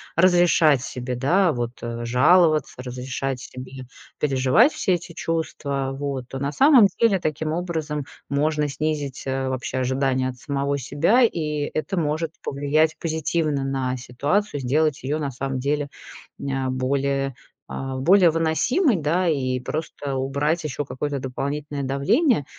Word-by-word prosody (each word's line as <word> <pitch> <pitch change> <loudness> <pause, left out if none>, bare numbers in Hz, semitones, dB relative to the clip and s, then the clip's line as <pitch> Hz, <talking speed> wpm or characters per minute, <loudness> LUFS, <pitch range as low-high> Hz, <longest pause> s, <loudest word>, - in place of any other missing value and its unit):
разрешать 170 -5 +4
себе, 125 0 -4
да, 165 +8 +2
вот, 120 -2 -2
э, 120 0 -4
жаловаться, 155 +5 +4
разрешать 130 +1 -4
себе 130 +1 -9 0.3
переживать 135 - +4
все 185 - +1
эти 170 0 -8
чувства, 140 -5 -2
вот, 135 -3 -4
то, 135 - -6
на 140 +1 -1
самом 260 - +6
деле, 225 -5 +4
таким 155 -1 -2
образом 160 -4 -3 0.2
можно 150 +1 +1
снизить, 145 -2 -3
э, 135 0 -1
вообще 130 0 -3
ожидания 130 0 0
от 125 - -8
самого 140 +1 -2
себя, 155 - +2
и 150 -8 0
это 180 +5 -2
может 155 0 -1
повлиять 145 +3 +1
позитивно 160 -2 -1
на 135 -2 -1
ситуацию, 145 +8 -1
сделать 150 +3 +1
ее 145 +4 -1
на 145 -2 -2
самом 135 0 -3
деле 145 +2 -1 0.5
ня 135 -1 -2
более, 135 +1 -1 0.3
э, 135 0 -4
более 180 +5 +6
выносимой, 190 - +2
да, 170 +3 +1
и 130 -5 0
просто 145 0 -4
убрать 140 +5 0
еще 145 -1 -3
какое-то 140 +2 -3
дополнительное 140 +2 -4
давление. 145 - +2
145 Hz, 140 wpm, -23 LUFS, 130-160 Hz, 0.5 s, самом